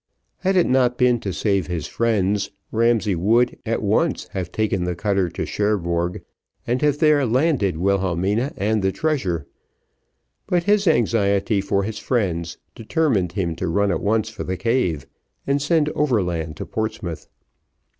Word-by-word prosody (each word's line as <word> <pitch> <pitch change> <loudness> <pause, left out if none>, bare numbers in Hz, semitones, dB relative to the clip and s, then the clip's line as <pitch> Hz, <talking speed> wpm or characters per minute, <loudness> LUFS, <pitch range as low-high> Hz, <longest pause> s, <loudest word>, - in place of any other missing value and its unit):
Had 190 0 +1
it 180 - +4
not 125 -1 +2
been 125 -1 +3
to 100 - -4
save 100 -1 0
his 85 -4 -3
friends, 105 -3 0 0.2
Ramsay 115 -2 +2
would, 115 +8 +2
at - - -1
once, - - +1
have 90 -2 -5
taken 105 -4 0
the 90 0 -2
cutter 95 0 0
to - - -4
Cherbourg, 90 -4 -1 0.4
and 125 +2 -1
have 145 -1 +2
there 150 -2 +4
landed 125 - +1
Wilhelmina 95 - 0
and 105 +1 +1
the 95 0 +1
treasure; 95 - -1 1.0
but 175 -1 +1
his 205 +1 +2
anxiety 105 -7 +2
for 100 0 0
his 105 +1 -4
friends, 85 -9 -1 0.2
determined 110 - 0
him 90 -4 -2
to 90 - -2
run 100 +4 +1
at - - -1
once 110 +1 +1
for 110 - -6
the 95 0 -3
cave, 90 - 0 0.4
and 140 +1 +1
send 150 +1 +2
overland 90 - -1
to - - -5
Portsmouth. 110 -6 -4
105 Hz, 155 wpm, -22 LUFS, 90-125 Hz, 1.0 s, it